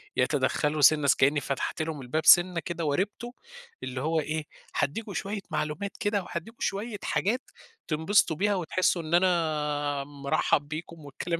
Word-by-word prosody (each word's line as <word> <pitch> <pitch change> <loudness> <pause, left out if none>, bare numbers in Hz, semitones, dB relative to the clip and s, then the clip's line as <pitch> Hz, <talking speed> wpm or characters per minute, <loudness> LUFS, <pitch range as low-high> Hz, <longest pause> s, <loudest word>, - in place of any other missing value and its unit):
يتدخّلوا 145 +3 +1
سِنّة 150 0 +6
س - - +5
كأني 145 +2 +3
فتَحت 140 +3 -3
لهُم 155 -3 -4
الباب 145 +6 -2
سِنّة 175 -1 +7
كده 170 -1 -4
وارِبتُه، 205 +10 -2 0.5
اللي 130 0 -4
هو 160 +2 +1
إيه، 155 0 -3 0.3
هادّيكم 200 +8 -2
شوية 200 +4 -3
معلومات 155 +7 -2
كده، 205 -3 0
وهادّيكم 180 +8 -7
شوية 210 +2 -2
حاجات 240 +7 0 0.5
تنبسطوا 160 +2 +2
بيها 205 +4 +1
وتحسّوا 180 0 +1
إن 160 +1 -6
أنا 150 -5 +1
مرحّب 145 +1 0
بيكم 155 0 -7
والكلام 170 +4 -3
160 Hz, 145 wpm, -27 LUFS, 145-185 Hz, 0.5 s, سِنّة